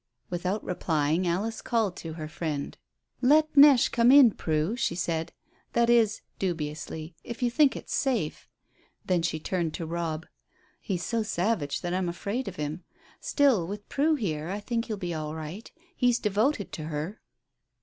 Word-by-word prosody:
Without 180 +4 -2
replying, 160 0 0
Alice 210 +6 -1
called 225 -7 0
to 165 -1 -6
her 155 -1 -6
friend. 155 -3 -4 0.5
"Let 305 +4 +4
Neche 280 -3 +7
come 235 +1 +5
in, 270 -4 +8
Prue," 160 +4 -1
she 235 -8 -1
said. 165 -2 -2 0.4
"That 235 0 +3
is" 225 -3 +3 0.2
dubiously 160 -2 -4
"if 235 +2 -6
you 240 - +2
think 285 +2 +4
it's - - -6
safe." 235 - -1 0.6
Then 180 -2 +2
she 160 -1 -1
turned 170 -1 -2
to 165 - -4
Robb. 165 -1 -3 0.5
"He's 180 -4 -3
so 230 -1 0
savage 195 -7 -1
that 175 0 -3
I'm 185 -1 0
afraid 200 +9 -3
of 190 - -5
him. 150 +3 -4 0.4
Still, 260 - +2
with 205 +2 -7
Prue 310 +3 +2
here, 165 - -3
I 200 +2 -3
think 230 +2 -2
he'll 215 -3 -4
be 175 -3 -3
all 155 -1 -4
right; 160 +7 -7 0.2
he's 245 -2 +3
devoted 215 +2 0
to 155 - -6
her." 155 +7 -4
185 Hz, 165 wpm, -28 LUFS, 160-230 Hz, 0.6 s, in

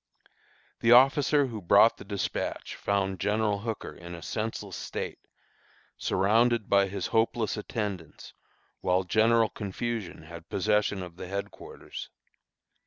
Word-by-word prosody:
The 115 +1 +5
officer 135 +3 +5
who 115 -5 -6
brought 85 - +5
the - - -10
despatch, - - -3
found 95 -1 -1
General 105 0 +1
Hooker 110 +1 -5
in 85 0 -9
a 85 - -10
senseless 110 +1 -4
state, - - -5 0.8
surrounded 115 +3 +2
by 100 -1 +4
his 95 -1 -4
hopeless 115 -1 +1
attendants, 105 -6 -5 0.5
while 90 +1 +1
general 110 +4 +3
confusion 105 -3 -4
had 85 +1 -11
possession 105 -1 +1
of 85 -1 -10
the 90 - -7
headquarters. 100 +2 -7
105 Hz, 120 wpm, -28 LUFS, 95-115 Hz, 0.8 s, The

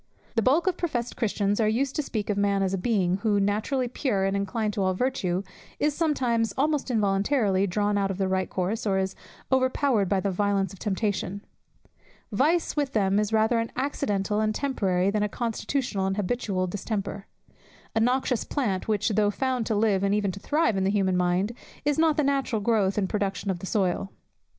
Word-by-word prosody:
The 225 - +2
bulk 280 +9 +3
of 375 - +1
professed 245 -9 -2
Christians 205 -2 0
are 220 - +3
used 255 +5 0
to - - +1
speak 215 -7 -3
of - - -1
man 200 -1 +2
as 190 0 0
of 195 - 0
a - - -7
being, 190 -5 +1
who, 205 0 +1
naturally 215 +6 0
pure, 235 -5 0
and 195 0 0
inclined 210 +2 -1
to 205 - -2
all 185 -1 +1
virtue, 190 -6 -1 0.3
is 295 0 +1
sometimes, 255 -8 0
almost 290 0 +1
involuntary, 200 -2 +2
drawn 205 +2 +1
out 195 -1 0
of 195 - -3
the 195 -1 0
right 190 0 0
course, 200 +5 -2
or 195 -1 +2
is 190 0 -1 0.4
overpowered 260 -5 +2
by 195 - +2
the 195 +1 -1
violence 200 0 0
of 195 - -13
temptation. 200 -1 -2 0.9
Vice 305 +11 +1
with 285 -2 -1
them 200 -2 +2
is 210 0 0
rather 220 +2 +3
an 230 - -2
accidental 210 -7 -1
and 215 0 0
temporary, 195 -9 +1
than 210 0 0
a 210 - +1
constitutional 230 -2 -2
and 195 +1 -1
habitual 200 -2 -1
distemper; 200 +1 -4 0.7
a - - +3
noxious 250 +1 +1
plant, 210 -10 -2
which, 210 0 +1
though 210 -1 +2
found 255 +1 -1
to 220 - 0
live 205 -2 +2
and 200 +1 +2
even 205 -2 0
to 195 - -8
thrive 295 -2 +1
in 190 - +1
the 190 - +2
human 195 -2 +1
mind, 180 +3 +1 0.3
is 295 +1 +1
not 320 -2 +3
the 300 - +3
natural 270 -5 0
growth 205 -2 +1
and 195 -2 +1
production 200 0 -1
of 180 - -4
the 190 - -6
soil. 195 -1 0
210 Hz, 200 wpm, -26 LUFS, 195-245 Hz, 0.9 s, bulk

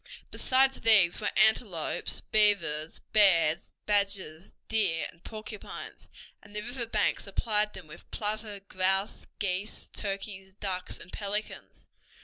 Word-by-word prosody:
Besides 265 +1 +3
these 200 -6 +5
were 210 - +1
antelopes, 215 -5 +2
beavers, 190 -8 +3 0.2
bears, 175 -6 +5
badgers, 195 -5 0
deer, 195 -7 +2
and 165 - -25
porcupines, 215 -1 -8 0.3
and 205 - -16
the 210 - -2
river 245 0 -4
banks 215 -2 0
supplied 210 +1 +1
them 190 -3 -10
with 150 - -14
plover, 210 -1 -3
grouse, 190 +1 -1
geese, 195 +1 -3
turkeys, 195 -1 -5
ducks, 185 -3 -3
and 180 - -13
pelicans. 205 +1 -5
200 Hz, 120 wpm, -29 LUFS, 185-215 Hz, 0.3 s, these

